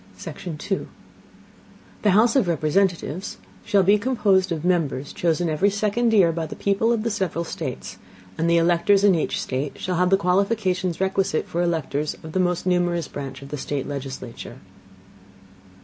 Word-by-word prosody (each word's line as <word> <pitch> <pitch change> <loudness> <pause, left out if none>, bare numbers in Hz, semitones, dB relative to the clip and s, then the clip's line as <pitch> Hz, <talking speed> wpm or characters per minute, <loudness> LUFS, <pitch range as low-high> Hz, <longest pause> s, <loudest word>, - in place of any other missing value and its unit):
Section 170 -4 -7
2. 195 +5 -3 1.1
The 210 - +3
House 220 +6 +4
of 255 -9 +3
Representatives 170 +1 0 0.3
shall 200 -2 +3
be 205 +3 +4
composed 200 -6 +2
of 165 0 -3
Members 155 -6 0
chosen 170 0 0
every 160 +6 +2
second 215 +3 0
Year 190 -6 +5
by 165 -1 -3
the - - -8
People 200 +3 +1
of 230 -2 0
the 230 - -1
several 185 -5 -2
States, 155 -5 -6 0.4
and 165 +1 0
the 170 - +4
electors 175 +4 +3
in 200 -2 +6
each 165 - -1
State 135 +2 -3
shall 180 -1 -2
have 180 +1 +3
the 195 - +5
qualifications 185 -1 0
requisite 190 -4 0
for 170 - -2
electors 155 -3 -1
of 160 - -8
the 185 - -1
most 180 -1 0
numerous 175 -3 +1
branch 135 -1 -7
of 140 - -11
the 150 - -4
State 140 0 -3
legislature. 130 -4 -7
175 Hz, 165 wpm, -23 LUFS, 155-195 Hz, 1.1 s, in